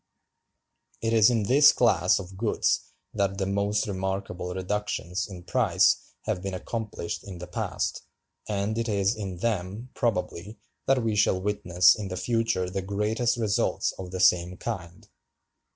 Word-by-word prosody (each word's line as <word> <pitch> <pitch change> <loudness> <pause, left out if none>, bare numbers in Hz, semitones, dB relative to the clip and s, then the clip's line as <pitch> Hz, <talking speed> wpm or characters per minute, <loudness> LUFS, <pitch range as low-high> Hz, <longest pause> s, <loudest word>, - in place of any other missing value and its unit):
It 115 0 -1
is 110 0 +6
in 115 -3 +1
this 135 +7 +7
class - - +3
of 95 0 -7
goods 105 +3 0 0.2
that 100 -2 0
the 95 - -1
most 100 +1 0
remarkable 95 -2 -3
reductions 95 -2 -2
in 90 -3 -9
price - - +2
have 105 -4 -2
been 95 -1 -4
accomplished 105 -2 -5
in 95 -3 -8
the 85 - -7
past, 90 - -3 0.5
and 105 +2 -1
it 115 0 -2
is 100 0 +1
in 95 -4 -5
them, 105 +3 -3
probably, 100 -2 -2 0.3
that 135 -2 +3
we 110 -2 0
shall 100 -2 +3
witness 90 -3 +4
in 105 -3 -5
the 90 0 -5
future 115 -5 0
the 95 +2 -3
greatest 105 +5 0
results 110 -3 0
of 95 -1 -6
the 95 0 -5
same 90 0 +3
kind." 95 -2 -6
100 Hz, 150 wpm, -27 LUFS, 90-110 Hz, 0.5 s, this